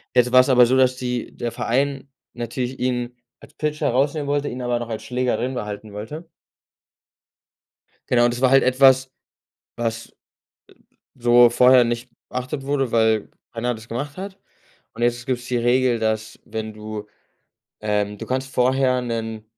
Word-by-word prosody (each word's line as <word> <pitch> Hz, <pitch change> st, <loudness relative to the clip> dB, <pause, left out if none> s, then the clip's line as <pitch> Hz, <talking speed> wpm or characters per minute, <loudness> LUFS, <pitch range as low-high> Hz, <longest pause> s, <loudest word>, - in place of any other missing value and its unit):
Jetzt 125 Hz, 0 st, +4 dB
war 130 Hz, -, +7 dB
es 130 Hz, -, +4 dB
aber 125 Hz, -1 st, +7 dB
so, 130 Hz, +2 st, +2 dB
dass 130 Hz, -1 st, +4 dB
die 125 Hz, -1 st, -4 dB
der 120 Hz, -1 st, -3 dB
Verein 135 Hz, +3 st, -1 dB, 0.2 s
natürlich 120 Hz, +2 st, -4 dB
ihn 125 Hz, -1 st, -2 dB, 0.2 s
als -, -, -17 dB
Pitcher 150 Hz, 0 st, -2 dB
herausnehmen 140 Hz, +4 st, 0 dB
wollte, 145 Hz, 0 st, 0 dB
ihn 125 Hz, -, -5 dB
aber 120 Hz, -1 st, -1 dB
noch 120 Hz, -1 st, -6 dB
als 110 Hz, -, -5 dB
Schlägerrin 125 Hz, 0 st, -1 dB
behalten 105 Hz, -2 st, -6 dB
wollte. 150 Hz, +11 st, -7 dB, 1.8 s
Genau, 120 Hz, -1 st, +4 dB
und 120 Hz, -, +3 dB
das 120 Hz, -, -5 dB
war 130 Hz, -1 st, +4 dB
halt 135 Hz, 0 st, +6 dB
etwas, 130 Hz, 0 st, +4 dB, 0.7 s
was, 115 Hz, -1 st, -3 dB
e -, -, -23 dB, 1.1 s
b 125 Hz, -, -24 dB
so 120 Hz, 0 st, +7 dB
vorher 125 Hz, +1 st, +6 dB
nicht 120 Hz, +1 st, -3 dB, 0.2 s
beachtet 130 Hz, +2 st, -4 dB
wurde, 135 Hz, -3 st, -1 dB
weil 110 Hz, -2 st, +2 dB, 0.2 s
keiner 120 Hz, +1 st, -1 dB
das 110 Hz, +1 st, -11 dB
gemacht 145 Hz, +7 st, -5 dB
hat. 195 Hz, +1 st, -7 dB, 0.6 s
Und 115 Hz, -, -9 dB
jetzt 120 Hz, +1 st, 0 dB
gibt's 125 Hz, -2 st, -2 dB
die 125 Hz, -1 st, -1 dB
Regel, 120 Hz, 0 st, +2 dB
dass 110 Hz, 0 st, -2 dB
wenn 110 Hz, -1 st, -5 dB
du 105 Hz, 0 st, -7 dB, 0.7 s
ähm, 105 Hz, -1 st, -1 dB
du -, -, -7 dB
kannst 130 Hz, +1 st, -3 dB
vorher 130 Hz, 0 st, +2 dB
'nen 115 Hz, -2 st, -4 dB
125 Hz, 165 wpm, -22 LUFS, 115-130 Hz, 1.8 s, war